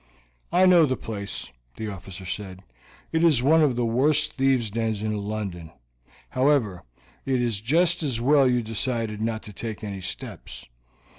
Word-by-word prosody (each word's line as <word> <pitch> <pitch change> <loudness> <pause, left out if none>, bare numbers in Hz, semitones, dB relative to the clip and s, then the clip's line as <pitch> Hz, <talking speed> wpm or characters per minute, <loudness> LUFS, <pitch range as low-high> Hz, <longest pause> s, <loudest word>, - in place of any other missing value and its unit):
"I 180 +2 +5
know 175 -4 +6
the 130 -2 -1
place," 100 -3 -5 0.2
the 110 - -5
officer 95 -1 -9
said. 95 0 -6 0.5
"It 165 0 +1
is 150 -8 +4
one 160 +4 +5
of 140 -5 +3
the 120 0 0
worst 140 +6 +2
thieves' 130 -5 +1
dens 110 -1 -2
in 110 0 -1
London. 100 -5 -4 0.6
However, 130 - +1 0.4
it 130 -2 0
is 115 -5 -1
just 170 +8 +2
as 135 -7 -1
well 140 +2 +4
you 125 -1 +2
decided 115 -1 -2
not 110 0 -2
to 105 - -10
take 110 +1 -6
any 100 -2 -5
steps. 90 - -7
115 Hz, 160 wpm, -25 LUFS, 105-135 Hz, 0.6 s, know